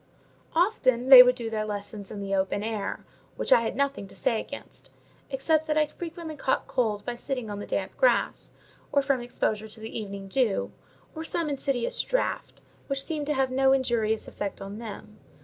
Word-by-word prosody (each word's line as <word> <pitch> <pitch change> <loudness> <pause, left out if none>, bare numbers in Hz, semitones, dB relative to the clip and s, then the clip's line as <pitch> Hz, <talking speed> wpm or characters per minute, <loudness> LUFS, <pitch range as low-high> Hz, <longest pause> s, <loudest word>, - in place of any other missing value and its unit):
Often 260 - +2
they 260 -2 +13
would 250 0 +5
do 230 -3 -5
their 215 -1 -1
lessons 205 -1 -6
in 205 - -6
the 195 0 -3
open 195 +1 0
air; 215 -2 -3 0.3
which - - -3
I - - +6
had 230 - -2
nothing 280 -6 -1
to - - -14
say 225 - +1
against: - - -10 0.4
except 310 +4 +1
that 305 0 +1
I 305 - +4
frequently 330 0 -7
caught 265 - 0
cold 215 -5 -1
by 245 - -2
sitting 245 -2 -4
on 205 - -5
the - - -7
damp - - -2
grass, - - +2 0.4
or 280 -1 +3
from 270 -2 +1
exposure 220 -3 -2
to 220 +1 -12
the 220 +1 -8
evening 200 -2 -6
dew, 220 -1 0 0.4
or 320 - -5
some 325 -1 -1
insidious 270 -3 -1
draught, - - -2 0.2
which 275 -1 -1
seemed 300 -3 -3
to 300 - +1
have 265 -1 +1
no 265 +1 +4
injurious 230 -5 +1
effect 200 -1 -5
on 195 +2 -7
them. 215 -1 -9
245 Hz, 190 wpm, -27 LUFS, 215-280 Hz, 0.4 s, they